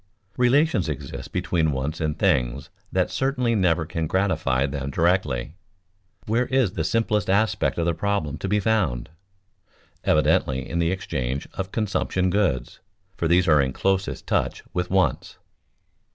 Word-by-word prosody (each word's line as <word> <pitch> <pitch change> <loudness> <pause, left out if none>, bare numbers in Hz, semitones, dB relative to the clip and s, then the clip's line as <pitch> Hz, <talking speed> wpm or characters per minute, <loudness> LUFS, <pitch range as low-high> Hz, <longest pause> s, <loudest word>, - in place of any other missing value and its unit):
Relations 125 - +3
exist 75 - -6
between 90 -4 0
wants 70 +4 -3
and 75 -1 -1
things 70 - 0 0.2
that - - +1
certainly 130 -3 0
never 90 -6 +2
can 80 +1 -3
gratify 95 -8 +1
them 70 -1 -4
directly. 75 -5 0 0.7
Where 115 +4 +1
is 130 -7 +2
the 80 - -2
simplest 105 +1 0
aspect 105 +3 +1
of 85 - 0
the 85 - +2
problem 90 -7 -2
to - - -3
be 105 +2 +2
found? 95 - 0 0.9
Evidently 65 -1 +2
in 85 - -2
the 85 -1 +2
exchange 65 -8 -3
of 95 0 -4
consumption 95 -3 0
goods, 85 -12 0 0.4
for 85 - -1
these 90 +2 +3
are 75 -3 +5
in 65 -1 -1
closest 95 +3 -1
touch - - -1
with 90 0 -1
wants. 95 -9 0
90 Hz, 145 wpm, -24 LUFS, 75-100 Hz, 0.9 s, are